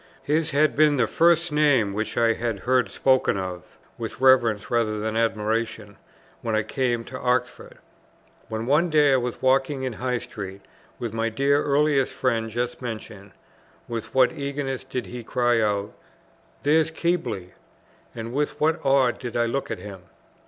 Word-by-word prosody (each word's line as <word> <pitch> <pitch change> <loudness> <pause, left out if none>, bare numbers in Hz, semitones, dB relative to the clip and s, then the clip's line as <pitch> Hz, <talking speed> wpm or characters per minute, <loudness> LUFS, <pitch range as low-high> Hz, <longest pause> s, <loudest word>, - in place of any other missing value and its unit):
His 155 +2 +1
had 150 0 +2
been 150 -1 +4
the 125 - +3
first 170 0 +3
name 145 -9 +3
which 110 +2 -3
I 115 -1 +4
had 115 -4 -3
heard 125 -4 +2
spoken 130 -4 +2
of, 90 -1 -6 0.2
with - - -6
reverence 120 -6 +3
rather 110 -3 +1
than 110 +1 -3
admiration, 110 -1 -1 0.5
when 110 -1 -1
I 110 - +1
came 120 +1 -1
up - - -14
to 130 +1 -7
Oxford. 125 0 -2 0.7
When 110 +1 -3
one 150 +7 +3
day 150 -3 +4
I - - +5
was 125 0 -4
walking 135 +1 +2
in 130 -2 -2
High 125 +2 -2
Street 100 -4 -8 0.4
with 115 -3 -5
my 115 0 0
dear 140 +5 +2
earliest 145 -1 +2
friend 115 -3 0
just 120 +3 -3
mentioned, 110 -5 -7 0.5
with 115 -2 -5
what 130 -2 +5
eagerness 140 -3 -4
did 125 - -4
he 120 -1 -8
cry 120 0 +1
out, 105 -1 -1 0.7
"There's 155 +2 +3
Keble!" 145 - -2 0.6
and 115 +1 -6
with 145 +2 -1
what 160 +2 +1
awe 135 -2 +4
did 120 -1 -6
I 120 - +2
look 135 +4 -2
at 115 - -3
him! 100 -3 -9
125 Hz, 165 wpm, -24 LUFS, 110-140 Hz, 0.7 s, I